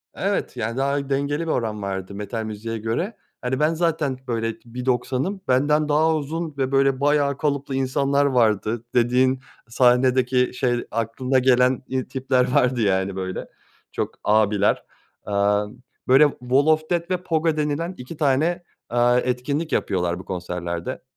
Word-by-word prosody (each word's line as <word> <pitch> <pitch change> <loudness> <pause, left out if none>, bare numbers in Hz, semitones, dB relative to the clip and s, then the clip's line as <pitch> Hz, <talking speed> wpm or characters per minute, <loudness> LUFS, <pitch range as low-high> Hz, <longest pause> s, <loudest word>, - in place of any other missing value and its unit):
Evet, 195 -9 -2
yani 115 +1 -3
daha 140 +1 -1
dengeli 140 +3 0
bir - - 0
oran 110 -3 -2
vardı 95 0 -4
metal 105 +2 -4
müziğe 110 +1 -5
göre. 115 - -3 0.2
Hani 130 +1 -2
ben 155 +2 +3
zaten 160 -5 0
böyle 115 -2 -1
1.90´ım. 125 - -2
Benden 150 +4 +2
daha 160 +2 +3
uzun 155 +1 -4
ve 135 -1 -1
böyle 135 -1 +3
bayağı 140 -1 +2
kalıplı 140 -2 -1
insanlar 140 +2 +1
vardı, 115 -3 +1
dediğin 125 +2 +3 0.3
sahnedeki, 125 +1 +3
şey, 125 -1 0
aklına 115 +4 0
gelen 125 0 +3
i 130 -1 -2
tipler 130 -1 0
vardı 125 -1 +2
yani 95 -2 +1
böyle. 95 -1 -4 0.4
Çok - - -3
abiler. 105 -1 +2 0.4
Eee, 105 - -4 0.7
böyle 135 +3 +6
wall 130 +3 +2
of 155 0 +4
death 170 0 -1
ve 185 - +2
pogo 160 -2 0
denilen 150 +4 -1
2 130 +6 -9
tane, 155 +5 +1 0.3
eee, 120 +1 +3
etkinlik 140 +6 -2
yapıyorlar 90 -2 0
bu 90 - -10
konserlerde. 85 -2 -4
130 Hz, 145 wpm, -23 LUFS, 115-145 Hz, 0.7 s, böyle